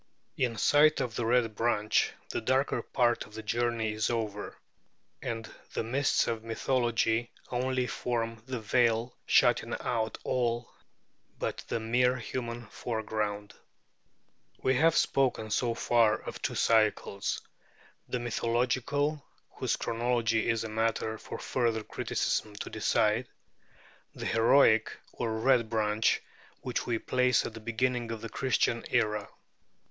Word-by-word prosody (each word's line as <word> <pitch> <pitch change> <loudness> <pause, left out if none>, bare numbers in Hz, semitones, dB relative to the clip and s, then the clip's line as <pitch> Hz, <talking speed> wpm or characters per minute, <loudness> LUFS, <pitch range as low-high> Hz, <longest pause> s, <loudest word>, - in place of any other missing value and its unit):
In 120 -3 0
sight 155 +5 +5
of 120 - -2
the 115 - -1
Red 120 -2 +2
Branch, 110 -1 +1 0.2
the - - -2
darker 135 +2 +1
part 120 -2 +1
of 105 - -15
the 110 - -6
journey 115 0 0
is 110 0 0
over; 110 -3 -3 0.6
and 115 -2 -4 0.3
the - - -1
mists 135 +5 +2
of 115 -1 -2
mythology 120 -1 0 0.2
only 130 +1 0
form 115 -2 -2
the 130 -2 -3
veil 115 +1 +1
shutting - - +3
out 110 -2 -1
all 120 -1 -1 0.7
but - - -3
the - - -1
mere 125 +3 +2
human 120 0 -5
foreground. 105 -2 -3 1.1
We 130 - +3
have 160 +5 +4
spoken 125 -5 +1
so 120 +1 +1
far 115 -2 +3
of - - -8
two - - -2
cycles 110 -3 +1 0.7
the - - -1
Mythological, 125 +5 0 0.3
whose - - -1
chronology 115 -1 0
is 115 -1 +1
a - - -3
matter 110 0 -1
for - - -7
further 115 -4 0
criticism 105 0 -2
to - - -6
decide; 110 +2 +1 0.9
the - - -6
Heroic, 115 -1 +4
or 115 -2 -3
Red 120 -1 +3
Branch, 110 -1 +2 0.4
which - - -3
we 120 -2 +1
place 125 +2 +2
at - - -5
the 115 - -8
beginning 120 +1 -1
of 115 -1 -5
the 115 - -6
Christian 120 -2 +1
era. 105 -2 +1
115 Hz, 130 wpm, -30 LUFS, 110-125 Hz, 1.1 s, sight